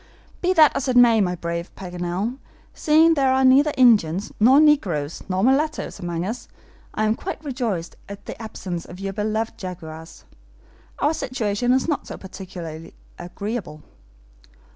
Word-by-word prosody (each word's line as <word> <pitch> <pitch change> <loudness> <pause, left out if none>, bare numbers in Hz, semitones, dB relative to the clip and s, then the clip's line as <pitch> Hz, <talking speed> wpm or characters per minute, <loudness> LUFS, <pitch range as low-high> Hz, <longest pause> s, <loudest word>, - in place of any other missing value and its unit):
"Be 365 - +2
that 310 -4 +6
as 275 - -2
it 250 -1 +2
may, 235 -3 +6
my 180 -2 0
brave 170 0 -4
Paganel, 180 +6 -4 0.3
seeing 320 +2 +4
there 270 -4 +2
are 265 0 +3
neither 275 +4 +5
Indians, 210 -7 +3
nor 255 +6 +6
negroes, 185 - +2
nor 185 +1 0
mulattoes 285 0 0
among 175 -1 -3
us, 225 +5 -5 0.5
I 215 - 0
am 215 0 +2
quite 315 +4 -7
rejoiced 230 - -3
at 200 0 -9
the - - -8
absence 185 -6 -6
of 180 - -12
your 195 0 -4
beloved 220 +2 -2
jaguars. 165 -4 -9 0.7
Our 295 - +1
situation 245 -4 -1
is 260 +3 +2
not 305 -4 -2
so - - -7
particularly 175 -4 -9 0.2
agreeable." 175 -3 -6
215 Hz, 150 wpm, -22 LUFS, 175-260 Hz, 0.7 s, that